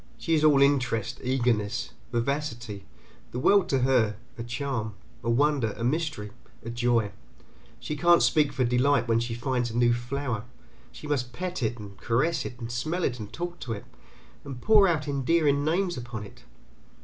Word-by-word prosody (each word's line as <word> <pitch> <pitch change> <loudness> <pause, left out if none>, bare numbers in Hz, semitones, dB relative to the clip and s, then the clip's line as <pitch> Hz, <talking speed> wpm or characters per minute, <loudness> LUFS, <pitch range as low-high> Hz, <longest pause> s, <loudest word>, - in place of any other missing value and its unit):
She 165 - -1
is 155 -1 +3
all 145 -3 +6
interest, 125 -6 +1
eagerness, 120 -5 0 0.2
vivacity, 120 -5 -2 0.4
the - - -6
world 185 +8 +4
is - - -16
to 135 - +2
her 120 -5 +3 0.2
a 120 - -7
charm, 120 -3 -3 0.3
a 115 - -1
wonder, 135 -2 +2
a 115 - -4
mystery, 150 -5 -1 0.3
a 115 - -4
joy; 120 -3 +1 0.7
she 120 +5 -4
can't 175 +3 +5
speak 150 -3 +3
for 130 - 0
delight 125 +1 +2
when 115 0 +3
she 115 0 -3
finds 125 0 -1
a 115 - -4
new 120 0 +4
flower, 120 -2 -3 0.5
she - - -11
must 130 -5 -1
pet 180 +3 -4
it 115 0 -1
and 100 -3 -10
caress 135 +9 +1
it 125 - -6
and 115 -1 -5
smell 155 +9 -2
it 125 -1 -1
and 105 -1 -7
talk 175 +1 -5
to 115 - -4
it, 105 - -7 0.6
and 135 -3 -7
pour 210 - +6
out 155 -4 0
endearing 145 +1 +2
names 175 +2 0
upon 120 -3 -6
it. 100 - -14
125 Hz, 180 wpm, -27 LUFS, 115-150 Hz, 0.7 s, all